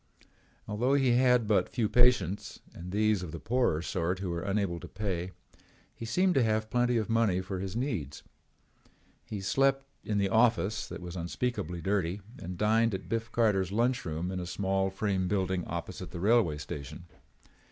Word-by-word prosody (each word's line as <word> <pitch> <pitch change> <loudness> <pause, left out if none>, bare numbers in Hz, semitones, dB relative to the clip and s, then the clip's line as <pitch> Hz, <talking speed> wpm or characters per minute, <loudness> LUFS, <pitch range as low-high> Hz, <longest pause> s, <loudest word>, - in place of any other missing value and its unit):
Although 120 +6 +1
he 135 -3 +3
had 125 -2 +4
but 105 -2 +2
few 115 -4 0
patients 115 -6 +2
and 90 +1 -8
these 105 -1 +2
of 90 -4 -6
the 85 - -6
poorer 105 - +1
sort 90 +1 -1
who 95 -1 -3
were 85 0 -2
unable 100 -3 -1
to - - -9
pay, 95 -3 -3 0.6
he 115 - -7
seemed 180 +10 +2
to 135 - +3
have 110 0 0
plenty 120 0 +2
of 110 - 0
money 115 -5 +2
for 95 0 -4
his 95 +1 -4
needs. 110 - -3 1.0
He 105 -2 -6
slept 135 +7 +2 0.2
in 105 - -1
the 100 -1 +2
office 110 -1 +2
that - - -7
was 90 0 -7
unspeakably 90 -1 -3
dirty 95 0 0 0.2
and 90 0 -6
dined 110 +1 +3
at 95 - -8
Biff 115 0 -2
Carter's 100 -5 +2
lunch 120 +5 +1
room 80 +2 -3
in 95 - -3
a 90 - -5
small 95 +1 0
frame 95 -1 -1
building 95 -2 0
opposite - - -5
the 85 - -7
railroad 95 -7 +3
station. 75 +4 -7
100 Hz, 175 wpm, -30 LUFS, 90-115 Hz, 1.0 s, had